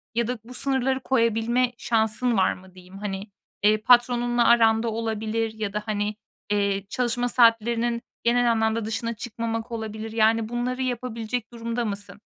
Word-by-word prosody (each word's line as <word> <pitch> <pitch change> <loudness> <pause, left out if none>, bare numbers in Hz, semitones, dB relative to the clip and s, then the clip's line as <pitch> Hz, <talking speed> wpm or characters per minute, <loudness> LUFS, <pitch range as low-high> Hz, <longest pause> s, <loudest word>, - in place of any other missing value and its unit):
Ya 235 -1 +1
da 250 -1 -3
bu 250 - -12
sınırları 265 0 0
koyabilme 240 0 +1
şansın 225 0 +1
var 190 - +3
mı 185 0 -15
diyeyim. 185 +1 -13
Hani, 200 0 -5 0.3
eee, 210 +1 +5
patronunla 240 0 +4
aranda 225 -1 +4
olabilir 220 0 -2
ya 215 -2 -4
da, 210 0 -2
hani, 210 -1 -2 0.4
eee, 200 -1 +1
çalışma 245 +1 0
saatlerinin 235 0 +3 0.2
genel 240 0 +3
anlamda 220 0 +1
dışına 225 +2 -2
çıkmamak 225 0 -4
olabilir. 220 -1 -5
Yani 225 0 +2
bunları 250 +2 -2
yapabilecek 240 -2 -3
durumda 235 +1 -3
mısın? 205 0 -6
230 Hz, 145 wpm, -25 LUFS, 215-240 Hz, 0.4 s, eee